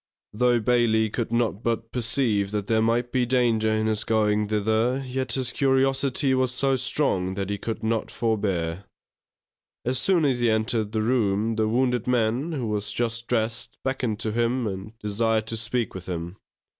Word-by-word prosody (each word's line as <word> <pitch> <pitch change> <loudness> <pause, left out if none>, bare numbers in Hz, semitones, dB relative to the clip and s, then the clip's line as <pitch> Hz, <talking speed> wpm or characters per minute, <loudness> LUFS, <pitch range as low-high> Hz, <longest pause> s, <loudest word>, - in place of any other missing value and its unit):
_ - - -10
Though 125 -1 +4
Bailey 110 -2 +2
could 115 -1 -3
not 115 -3 0
but 115 -1 -2
perceive 115 -4 0
that 105 -1 -2
there 110 +1 +2
might 120 +2 +1
be 130 -1 +2
danger 120 -3 +2
in 110 0 +1
his 110 -1 +1
going 105 -1 +1
thither, 110 +5 +1
yet 130 -1 -2
his 130 -2 0
curiosity 135 0 +2
was 130 -1 +2
so 135 +1 +1
strong 120 -8 0
that 100 0 -3
he 100 - -3
could 110 +1 -4
not 110 0 -1
forbear. 100 -6 -1 1.0
As 125 +1 +1
soon 170 +4 +3
as 130 -3 +1
he 120 -1 +2
entered 110 -1 +1
the 110 -1 0
room 110 -2 +1
the 110 -1 +1
wounded 125 0 +1
man, 125 +5 +1
who 130 -6 -2
was 105 -1 -2
just 115 +1 -2
dressed, 115 0 -1
beckoned 125 -5 -2
to 110 - -1
him, 120 +2 0
and 100 +2 -6
desired 110 +1 0
to 115 - -2
speak 115 +1 -1
with 95 0 -8
him. 85 +2 -5
115 Hz, 180 wpm, -25 LUFS, 110-125 Hz, 1.0 s, Though